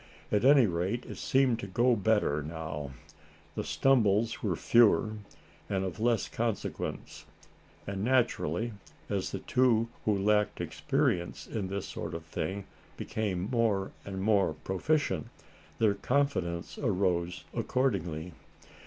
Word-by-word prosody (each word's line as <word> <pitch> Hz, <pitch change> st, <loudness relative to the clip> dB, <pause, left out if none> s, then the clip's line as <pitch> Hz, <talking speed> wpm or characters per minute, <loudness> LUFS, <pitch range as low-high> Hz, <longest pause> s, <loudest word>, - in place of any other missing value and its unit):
At 105 Hz, +1 st, +2 dB
any 135 Hz, -1 st, +7 dB
rate 95 Hz, +6 st, -1 dB
it -, -, -8 dB
seemed 130 Hz, -3 st, +2 dB
to -, -, -5 dB
go 120 Hz, +6 st, +3 dB
better 105 Hz, -8 st, +2 dB
now. 75 Hz, -2 st, -5 dB, 0.6 s
The -, -, -3 dB
stumbles 115 Hz, -4 st, +2 dB
were 95 Hz, -5 st, 0 dB
fewer, 115 Hz, +2 st, +4 dB, 0.6 s
and 95 Hz, -1 st, 0 dB
of 95 Hz, +2 st, -5 dB
less 115 Hz, -1 st, +2 dB
consequence, 115 Hz, -3 st, -4 dB, 0.6 s
and 100 Hz, 0 st, -3 dB
naturally, 120 Hz, -, +1 dB, 0.4 s
as -, -, -1 dB
the -, -, -3 dB
two 115 Hz, -3 st, +2 dB, 0.2 s
who 105 Hz, -2 st, +2 dB
lacked 105 Hz, +1 st, +2 dB
experience 85 Hz, 0 st, -1 dB
in 105 Hz, -5 st, -3 dB
this 100 Hz, 0 st, -3 dB
sort -, -, -5 dB
of 80 Hz, -1 st, -7 dB
thing, 95 Hz, +4 st, -3 dB, 0.3 s
became 100 Hz, -4 st, -2 dB
more 110 Hz, -5 st, +1 dB
and 95 Hz, -1 st, -5 dB
more 100 Hz, -7 st, +3 dB
proficient, 95 Hz, -, 0 dB, 0.5 s
their 110 Hz, -3 st, +3 dB
confidence 100 Hz, -8 st, -1 dB
arose 90 Hz, -2 st, 0 dB
accordingly. 90 Hz, -10 st, -1 dB
100 Hz, 125 wpm, -30 LUFS, 90-115 Hz, 0.6 s, any